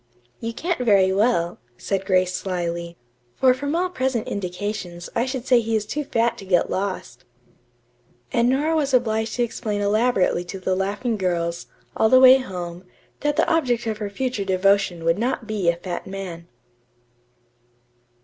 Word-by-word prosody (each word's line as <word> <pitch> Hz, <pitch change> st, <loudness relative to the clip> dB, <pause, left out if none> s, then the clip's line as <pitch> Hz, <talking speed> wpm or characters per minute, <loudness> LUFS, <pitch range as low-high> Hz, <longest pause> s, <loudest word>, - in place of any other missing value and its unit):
"You 230 Hz, -, -3 dB
can't 335 Hz, +8 st, -2 dB
very 200 Hz, -6 st, +4 dB
well," 195 Hz, -5 st, +1 dB, 0.2 s
said 195 Hz, -1 st, -3 dB
Grace 185 Hz, -1 st, +2 dB
slyly, 170 Hz, -2 st, -3 dB, 0.4 s
"for 255 Hz, -1 st, +4 dB
from 285 Hz, +4 st, -3 dB
all 360 Hz, +2 st, +1 dB
present 260 Hz, -9 st, -2 dB
indications 180 Hz, -2 st, -5 dB
I 235 Hz, +2 st, +1 dB
should 260 Hz, -2 st, -4 dB
say 255 Hz, -2 st, +5 dB
that 230 Hz, -, -4 dB
he 225 Hz, 0 st, 0 dB
is 215 Hz, -1 st, 0 dB
too 295 Hz, +8 st, -3 dB
fat 230 Hz, -2 st, 0 dB
to -, -, -9 dB
get 180 Hz, -2 st, +2 dB
lost." 185 Hz, -10 st, -4 dB, 1.1 s
And 235 Hz, +1 st, +3 dB
Nora 295 Hz, +5 st, +1 dB
was 280 Hz, -4 st, +2 dB
obliged 220 Hz, -2 st, 0 dB
to 245 Hz, -, +1 dB
explain 215 Hz, -3 st, -3 dB
elaborately 205 Hz, -3 st, +2 dB
to 190 Hz, +2 st, -7 dB
the 185 Hz, 0 st, -1 dB
laughing 205 Hz, +5 st, -1 dB
girls, 170 Hz, -2 st, -2 dB, 0.3 s
all 220 Hz, -, +3 dB
the 255 Hz, -, +7 dB
way 260 Hz, 0 st, +8 dB
home, 180 Hz, -7 st, -6 dB, 0.4 s
that 295 Hz, 0 st, 0 dB
the -, -, +2 dB
object 255 Hz, -9 st, +1 dB
of 220 Hz, -1 st, -3 dB
her 210 Hz, -2 st, -3 dB
future 245 Hz, 0 st, -2 dB
devotion 190 Hz, -2 st, +1 dB
would 165 Hz, +3 st, +2 dB
not 240 Hz, 0 st, -1 dB
be 210 Hz, -5 st, 0 dB
a 170 Hz, -, +2 dB
fat 175 Hz, +1 st, -6 dB
man. 185 Hz, -3 st, -7 dB
205 Hz, 170 wpm, -23 LUFS, 185-245 Hz, 1.1 s, way